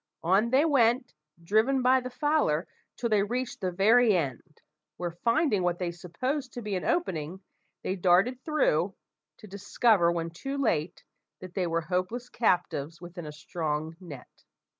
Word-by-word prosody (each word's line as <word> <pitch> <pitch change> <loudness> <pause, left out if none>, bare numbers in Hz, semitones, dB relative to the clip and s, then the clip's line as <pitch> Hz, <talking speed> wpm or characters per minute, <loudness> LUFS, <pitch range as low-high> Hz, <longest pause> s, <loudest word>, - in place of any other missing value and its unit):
On 195 +7 +3
they 270 +5 +4
went, 245 -4 +2 0.3
driven 225 +8 +2
by 260 +1 +5
the 255 0 -6
fowler, 275 - +1 0.3
till 240 - -1
they 210 -2 +3
reached 245 +5 -3
the 185 -1 -1
very 215 +3 +4
end; 150 +1 -5 0.4
where, 175 -1 -3
finding 230 - +1
what 175 -1 0
they 175 -1 -2
supposed 255 - -4
to 240 - -6
be 210 -1 -4
an 185 - -2
opening, 180 - -2 0.4
they 185 - -1
darted 190 +8 +3
through, 195 - +1 0.4
to - - -13
discover, 200 -2 +2
when 165 -1 -3
too 270 +11 -5
late, 175 - -1 0.4
that 185 0 -10
they 185 -3 -1
were 165 0 0
hopeless 185 +9 -3
captives 175 - 0
within 175 -1 -9
a - - -6
strong 155 0 -4
net! 150 -9 -12
190 Hz, 160 wpm, -28 LUFS, 170-245 Hz, 0.4 s, by